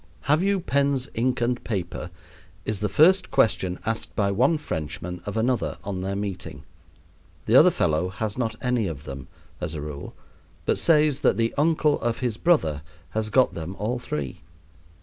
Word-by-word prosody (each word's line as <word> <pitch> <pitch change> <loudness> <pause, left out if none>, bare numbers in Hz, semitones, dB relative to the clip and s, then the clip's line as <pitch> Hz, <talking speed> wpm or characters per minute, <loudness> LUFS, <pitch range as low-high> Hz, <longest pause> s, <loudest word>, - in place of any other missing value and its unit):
"Have 150 - +2
you 200 0 +2
pens, 140 -4 +1
ink, 125 +2 0
and 120 +1 0
paper?" 90 -5 -4 0.6
is 110 -2 -2
the 105 0 -1
first 185 +5 +5
question 95 -4 +2
asked 110 0 -3
by 100 -2 +1
one 130 +11 +3
Frenchman 85 - -5
of 100 - -3
another 120 +2 0
on 95 -2 -4
their 95 +1 -2
meeting. 95 -8 -5 0.8
The - - +3
other - - +9
fellow 80 +4 +1
has 105 +3 -3
not 115 -3 -2
any 125 -5 +1
of 75 -5 -6
them, 70 -1 -8 0.3
as 90 -2 -4
a 75 - -4
rule, 75 -1 -7 0.5
but - - +1
says 150 -4 +3
that - - +3
the 115 0 +1
uncle 150 0 +2
of 115 0 0
his 120 -4 -2
brother 80 - +2 0.3
has 110 0 -1
got 130 +4 +3
them 85 +3 -6
all 115 +6 -2
three. 75 - -5
110 Hz, 170 wpm, -25 LUFS, 90-130 Hz, 0.8 s, other